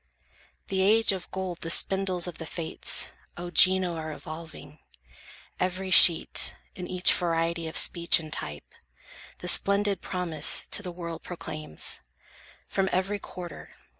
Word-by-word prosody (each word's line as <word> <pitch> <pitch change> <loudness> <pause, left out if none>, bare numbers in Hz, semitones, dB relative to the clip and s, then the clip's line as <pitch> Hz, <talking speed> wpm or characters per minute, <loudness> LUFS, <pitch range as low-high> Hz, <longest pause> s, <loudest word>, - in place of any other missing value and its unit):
The 190 -1 -1
age 220 +3 +4
of 190 -3 -6
gold 185 -2 -5
the 165 - -5
spindles 190 0 +2
of 175 -2 -7
the 165 - -7
Fates, 165 -1 -1 0.3
O 175 0 -7
Gino, 185 -1 +4
are 155 -1 -6
evolving. 155 0 -10 0.8
Every 185 +1 -3
sheet, 170 -1 +6 0.2
In 180 -2 -8
each 185 0 +5
variety 165 -1 -2
of 160 - -3
speech 170 0 +4
and 155 -2 -8
type, 75 -1 -4 0.6
The 180 - -8
splendid 200 +1 +3
promise 180 -4 -2
to - - +2
the 180 -3 -7
world 170 -2 -8
proclaims, 155 - -5 0.7
From 190 -1 -1
every 195 +3 -1
quarter. 180 -3 -10
180 Hz, 135 wpm, -26 LUFS, 165-190 Hz, 0.8 s, sheet